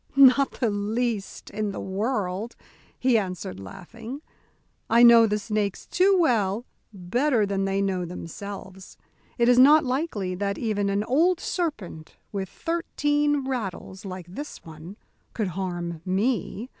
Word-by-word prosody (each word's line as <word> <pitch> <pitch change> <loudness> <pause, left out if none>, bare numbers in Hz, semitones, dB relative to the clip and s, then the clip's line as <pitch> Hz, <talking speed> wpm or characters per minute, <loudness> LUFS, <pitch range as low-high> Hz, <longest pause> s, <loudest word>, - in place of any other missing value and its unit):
"Not 275 0 +6
the 235 -4 +1
least 210 +1 -2
in 210 0 -2
the - - -6
world," 200 +1 -2 0.4
he 250 -3 +3
answered, 180 - -5
laughing. 225 - -9 0.7
"I 235 +1 +6
know 235 -1 +8
the 210 0 0
snakes 210 -2 -2
too 385 +2 +3
well, 230 - +1 0.3
better 220 +6 +1
than 195 -1 -1
they 195 0 0
know 185 -2 -1
themselves. 190 +2 -8 0.4
It 235 -1 +3
is 245 0 +6
not 295 +3 +7
likely 250 - -2
that 200 +2 -2
even 205 -4 -1
an 200 +1 0
old 330 +10 +2
serpent 215 - -4
with 195 -2 -4
thirteen 295 - 0
rattles, 195 -5 -4
like 185 -3 -7
this 285 +12 -8
one, 160 +5 -10 0.4
could 215 -5 -1
harm 175 -2 -4
me. 210 +4 -1
210 Hz, 135 wpm, -25 LUFS, 190-255 Hz, 0.7 s, know